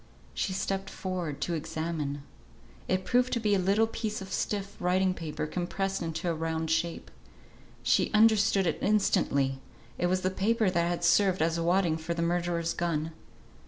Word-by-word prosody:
She - - -1
stepped 195 +1 -2
forward 180 -6 -4
to 175 - -1
examine. 155 -3 -3 0.6
It 185 0 0
proved 250 +1 +2
to 235 - +1
be 210 -2 +1
a 200 - +3
little 200 +4 +3
piece 220 -1 -4
of 190 0 -7
stiff 200 -1 -2
writing 185 +1 +2
paper 160 -3 -4
compressed 190 +4 -2
into 165 +1 -3
a 170 - +1
round 160 0 -2
shape. 165 +1 -1 0.7
She - - +2
understood 215 -2 +4
it 165 - 0
instantly; 140 -10 +2 0.4
it 175 - +2
was 185 +1 +1
the 185 - 0
paper 215 +1 +1
that 170 -1 +1
had 175 0 -2
served 180 0 +4
as 165 +1 0
wadding 170 -1 +2
for 165 +1 -4
the 170 - -1
murderer's 170 -1 0
gun. 165 -2 -1
175 Hz, 165 wpm, -29 LUFS, 165-195 Hz, 0.7 s, understood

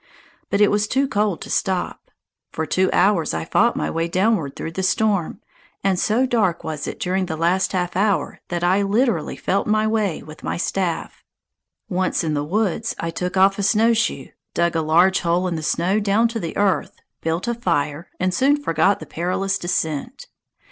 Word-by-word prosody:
But 200 - +1
it 210 - +5
was 210 +1 +1
too 270 +5 +1
cold 210 -6 0
to - - -7
stop. 185 -2 -2 0.4
For 160 - -3
two 185 +4 +1
hours 185 - +2
I 80 0 -3
fought - - +2
my 75 - -1
way 165 +1 -1
downward 185 -5 0
through 165 - -5
the 190 - -3
storm, 195 -1 0 0.4
and 190 -2 +1
so 230 +6 +2
dark 210 -9 +1
was 155 -2 -4
it - - -6
during 185 +1 -1
the 160 - -4
last 180 +4 +1
half 180 -1 -1
hour 200 +1 0
that 175 -1 -3
I 185 +3 +3
literally 225 +5 +1
felt 195 - -1
my 215 0 +2
way 215 -5 0
with 155 +1 -12
my - - -3
staff. 180 -1 -2 0.6
Once 185 -2 0
in 155 -2 -1
the 145 -1 -1
woods, 210 +5 -1
I 165 - -2
took 180 +2 -3
off 195 +1 +4
a - - +1
snowshoe, 225 +3 +2 0.3
dug 170 0 +1
a 165 - +2
large 175 +5 +4
hole 175 +1 +1
in 175 - -2
the 160 - -4
snow 175 +6 +1
down 210 +3 +2
to 230 0 -4
the 165 -5 -5
earth, 200 -2 +1 0.3
built 165 +6 -2
a 240 - +1
fire, 165 -7 -2
and 185 0 0
soon 280 +6 +3
forgot 190 - +1
the - - -6
perilous 185 +3 -2
descent. 175 - -3
185 Hz, 190 wpm, -21 LUFS, 170-210 Hz, 0.6 s, it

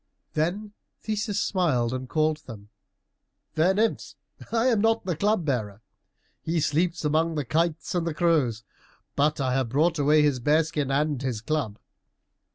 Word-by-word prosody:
Then 190 +7 -2 0.3
Theseus 210 -1 -2
smiled 140 - +1
and 130 0 -5
called 155 -1 +1
them. 105 -4 -10 0.8
"Fair 170 +4 +2
nymphs, 220 +2 -1 0.4
I 230 +1 +1
am 230 -5 +3
not 225 -1 +2
the 180 -3 -1
Club 200 0 +1
bearer. 110 -7 -2 0.6
He 165 +1 -1
sleeps 165 +3 0
among 160 +2 +1
the 150 -3 -2
kites 165 +4 -1
and 170 -3 -1
crows, 150 -11 +1 0.5
but 150 +2 +1
I 130 -2 0
have 130 -2 0
brought 155 +5 +1
away 150 +1 +4
his 145 -4 +2
bear 150 +6 +3
skin 150 -3 -3
and 145 -1 0
his 130 -5 -2
club." 115 -4 -2
155 Hz, 155 wpm, -26 LUFS, 135-175 Hz, 0.8 s, away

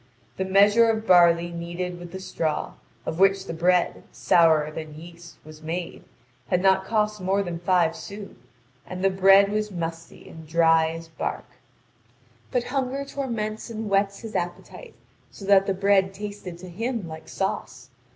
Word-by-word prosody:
The 190 - -1
measure 205 +4 +5
of 220 0 -1
barley 175 -2 +5
kneaded 175 +1 -5
with 175 -1 -10
the 190 - -7
straw, 165 -5 -3 0.3
of 160 - -4
which 195 0 +3
the - - -5
bread, 175 +2 +1
sourer 160 -3 +3
than 155 -1 -8
yeast, 170 +2 -13
was 155 0 -13
made, 170 +2 -5 0.4
had 180 - +1
not 190 0 +3
cost 210 -1 0
more 195 +2 +1
than 175 -2 -5
five 175 -2 +2
sous; 200 0 -9 0.5
and 185 +1 -6
the 195 - +3
bread 195 +1 +5
was 210 0 -1
musty 165 -3 -7
and 160 - -11
as - - -19
dry 165 -1 +4
as 165 0 -7
bark. 160 - -5 1.0
But 250 -1 0
hunger 270 +1 -2
torments 230 -7 -4
and 220 -2 -5
whets 195 0 +1
his 225 -2 -8
appetite, 180 - -5 0.3
so 200 - -11
that 195 -1 +4
the 195 - +1
bread 195 0 +2
tasted 205 -3 -7
to 185 +1 -11
him 225 +1 -3
like 160 0 -10
sauce. 130 -9 -4
185 Hz, 165 wpm, -24 LUFS, 170-205 Hz, 1.0 s, measure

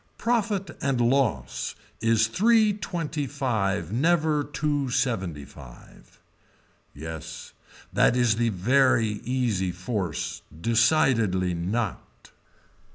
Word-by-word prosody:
Profit 210 -6 -1
and 135 -3 0
loss 120 - 0 0.3
is 115 0 +3
three 215 - +3
twenty 165 -7 -3
five 105 - -1
never 155 +2 +2
two 145 -1 -1
seventy 95 - -1
five. - - -15 0.7
Yes 80 +1 -8 0.4
that - - +4
is 120 -3 +3
the 120 0 +2
very 115 +1 +2
easy 120 -7 0
force, 90 -2 -4 0.2
decidedly 115 - +2
not. 95 +4 -4
120 Hz, 95 wpm, -26 LUFS, 95-145 Hz, 0.7 s, that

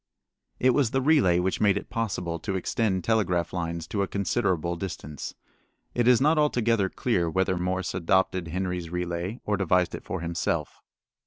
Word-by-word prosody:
It 130 - +4
was 130 -2 +2
the 135 - +1
relay 135 - +4
which 90 +1 0
made 100 -2 +4
it - - -7
possible 90 -7 -2
to 95 +3 -3
extend 95 0 0
telegraph 90 -6 +1
lines 85 -2 -3
to 100 - -1
a 100 - 0
considerable 95 -4 0
distance. 85 -5 -6 0.6
It 120 -1 +1
is 125 -2 +6
not 155 +3 +3
altogether 115 -8 +2
clear 90 -9 0
whether 95 +2 +1
Morse 90 +1 -2
adopted 95 0 +1
Henry's 90 0 -3
relay 90 +5 -3
or 105 -1 +1
devised 90 -2 +2
it - - -6
for - - -4
himself. 85 -2 -2
95 Hz, 165 wpm, -26 LUFS, 85-110 Hz, 0.6 s, is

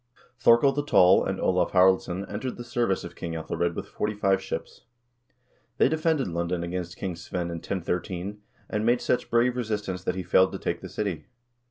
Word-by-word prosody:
Thorkel 120 +3 +6
the 145 +1 -2
Tall 95 -10 +5
and 95 0 -2
Olav 90 -1 +1
Haraldsson 95 0 +3
entered 125 +5 -4
the 120 - -6
service 120 -5 0
of - - -8
King 85 - -5
/Ethelred 85 +1 -2
with - - -4
forty 105 0 -3
five 95 -2 +2
ships. 95 - -6 1.0
They - - +5
defended 155 -2 +1
London 85 0 -2
against 85 0 -4
King 95 -3 -3
Svein 85 +1 -4
in 85 - -4
1013, 90 +3 -4 0.3
and 105 0 -2
made 120 +2 +3
such 125 - 0
brave 120 +1 +3
resistance 105 -6 -3
that - - 0
he 95 - -3
failed 95 +1 +4
to - - -3
take - - -3
the - - -8
city. 100 -7 -3
95 Hz, 185 wpm, -26 LUFS, 90-115 Hz, 1.0 s, Thorkel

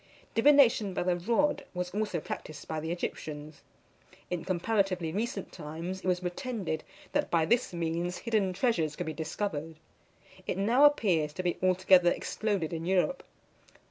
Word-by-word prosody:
Divination 230 -6 +5
by - - 0
the 180 0 +2
rod 235 +12 +1
was 180 0 -3
also 210 -4 -1
practised 150 -1 -7
by 160 - -2
the 160 +1 -4
Egyptians. 155 -3 -5 0.7
In 175 -2 -2
comparatively 185 -2 0
recent 235 - -3
times, 165 +3 -6
it - - -5
was 180 0 +1
pretended 180 - -3 0.3
that - - 0
by 165 -2 +3
this 235 +7 +2
means 170 +1 -2
hidden 215 -5 0
treasures 170 - +1
could 175 - -4
be 160 - -3
discovered. 160 -1 -3 0.7
It - - -1
now 235 +9 +5
appears 175 - +3
to 185 - -4
be 175 -1 -1
altogether 185 -1 +5
exploded 195 -4 -1
in 165 +1 -4
Europe. 190 +8 +1
180 Hz, 150 wpm, -30 LUFS, 165-210 Hz, 0.7 s, Divination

